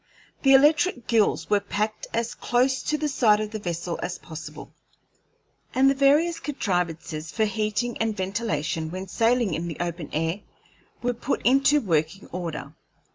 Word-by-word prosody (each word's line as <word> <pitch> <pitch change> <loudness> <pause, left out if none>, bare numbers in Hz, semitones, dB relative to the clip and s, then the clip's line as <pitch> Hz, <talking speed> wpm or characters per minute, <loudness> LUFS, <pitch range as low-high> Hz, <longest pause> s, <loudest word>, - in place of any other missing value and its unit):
The 270 -1 +6
electric 295 -2 +4
gills 225 -3 +2
were 205 -1 +3
packed 210 +2 -3
as 230 0 -1
close 255 +2 +1
to 305 - -1
the 305 0 -1
side 225 -7 +3
of 215 -1 -3
the 215 - -4
vessel 170 -2 -4
as 180 - -3
possible, 160 -2 -9 1.0
and 270 +1 +5
the - - +2
various 295 +5 +3
contrivances 170 - -2
for 220 +4 +1
heating 215 +3 -1
and 225 -1 -1
ventilation 185 -5 -2
when 185 +3 -6
sailing 230 +1 +2
in 165 +2 -2
the 165 - -5
open 170 -2 -4
air 165 +5 -1 0.6
were 245 0 +1
put 245 +3 -3
into 275 +3 +4
working 165 - -1
order. 165 -5 -5
215 Hz, 155 wpm, -25 LUFS, 170-250 Hz, 1.0 s, The